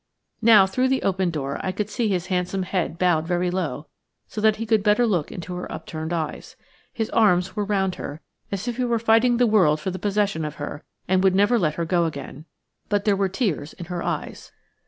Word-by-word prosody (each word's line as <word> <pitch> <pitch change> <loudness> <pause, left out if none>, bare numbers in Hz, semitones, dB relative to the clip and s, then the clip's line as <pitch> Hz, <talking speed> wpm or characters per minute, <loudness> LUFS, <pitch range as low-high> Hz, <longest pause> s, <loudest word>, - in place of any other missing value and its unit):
Now, 220 -4 +7
through 255 +7 0
the 265 0 0
open 190 -2 +1
door, 140 -4 -3
I 185 - -1
could 200 +2 -3
see 225 +2 -1
his 180 -3 -1
handsome 185 0 -1
head 180 -2 -2
bowed 165 -3 +2
very 175 0 0
low, 160 -5 -3 0.4
so 215 - -5
that 215 0 +4
he 225 - -4
could 220 -1 +2
better 210 +4 +3
look 180 -9 0
into 180 0 -6
her 180 0 -6
upturned 160 0 -6
eyes. 160 -3 -4 0.4
His 225 -2 -3
arms 190 -4 +3
were 210 - 0
round 195 -2 0
her, 145 +2 -6 0.3
as 200 +4 -3
if 240 -1 -3
he 255 - 0
were 235 -1 +1
fighting 230 +2 +3
the 245 - +4
world 185 -9 +4
for 185 +5 -3
the 185 - -6
possession 200 -4 0
of 150 -1 -4
her, 145 0 -6 0.2
and 185 0 +2
would 190 -1 +4
never 205 +5 +4
let 155 -5 0
her 170 - -2
go 170 0 +2
again. 150 -1 -6 0.4
But 205 -1 0
there 205 -2 +3
were 195 -1 0
tears 180 - -2
in 175 - -9
her 175 - -3
eyes. - - -4
190 Hz, 220 wpm, -23 LUFS, 170-210 Hz, 0.4 s, Now